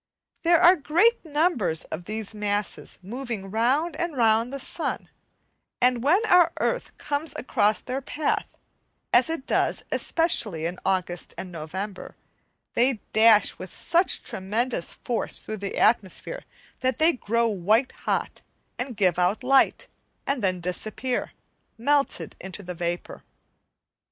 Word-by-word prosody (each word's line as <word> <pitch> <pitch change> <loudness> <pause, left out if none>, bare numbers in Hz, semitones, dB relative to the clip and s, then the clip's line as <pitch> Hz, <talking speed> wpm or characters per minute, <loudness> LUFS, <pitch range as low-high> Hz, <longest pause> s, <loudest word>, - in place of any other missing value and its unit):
There 340 0 +4
are 355 +2 +7
great 350 +10 +2
numbers 295 - +1
of 175 - -7
these 215 +1 -4
masses 205 -1 -2
moving 225 -2 -5
round 265 +10 +1
and 340 -4 -3
round 225 +1 +3
the 275 - -5
sun, - - -4 0.7
and 250 -1 +3
when 355 - +3
our 360 -5 +5
earth - - -2
comes 295 +2 -3
across 215 -4 +1
their 260 +2 -4
path, 295 +3 -1 0.7
as - - +5
it 325 -5 -3
does - - 0
especially 215 - +1
in 175 +2 -3
August 180 -2 -1
and 185 - -6
November, 185 +5 -6 0.6
they 255 +3 +3 0.2
dash 220 -1 +5
with 185 -1 -9
such 345 +2 +2
tremendous 210 +1 -1
force 240 -2 -1
through 215 - -5
the 200 -1 -5
atmosphere 230 - 0 0.3
that 260 0 0
they 325 +2 +4
grow 235 -2 0
white 215 +5 +2
hot, - - -3 0.4
and 250 -3 -4
give 185 -4 +2
out 185 +7 +1
light, 270 +1 +3 0.4
and 275 -5 -1
then 185 -2 0
disappear, 215 +8 -3 0.5
melted 275 - +1
into 190 +2 -7
vapour. 175 0 -4
230 Hz, 130 wpm, -25 LUFS, 195-285 Hz, 0.7 s, are